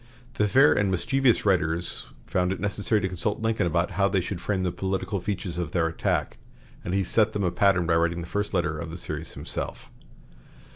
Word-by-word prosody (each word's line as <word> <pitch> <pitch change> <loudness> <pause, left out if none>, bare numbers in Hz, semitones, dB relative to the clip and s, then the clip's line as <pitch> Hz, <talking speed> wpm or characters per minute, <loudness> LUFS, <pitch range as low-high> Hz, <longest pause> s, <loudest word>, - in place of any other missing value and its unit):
The 105 - +1
fair 135 +7 +6
and 100 -1 +1
mischievous 125 +7 +2
writers 85 -3 0 0.2
found 90 0 0
it 95 - -3
necessary 105 +2 0
to 95 - 0
consult 100 +4 -1
Lincoln 115 -5 +1
about 85 +1 0
how 100 -1 +2
they 95 -1 +2
should 90 0 -4
frame 95 -1 -1
the 90 - 0
political 95 +2 -2
features 90 -2 -4
of 80 -3 -4
their 85 -2 +2
attack, 80 0 -1 0.4
and 90 - -2
he 100 - +2
set 110 +4 +2
them 100 - -1
a 90 - +1
pattern 95 -3 +3
by 85 - +2
writing 85 +1 +1
the - - -6
first 105 +2 -2
letter 80 -3 0
of 85 - -5
the 85 - -7
series 80 -2 -5
himself. - - -5
95 Hz, 205 wpm, -26 LUFS, 85-100 Hz, 0.4 s, fair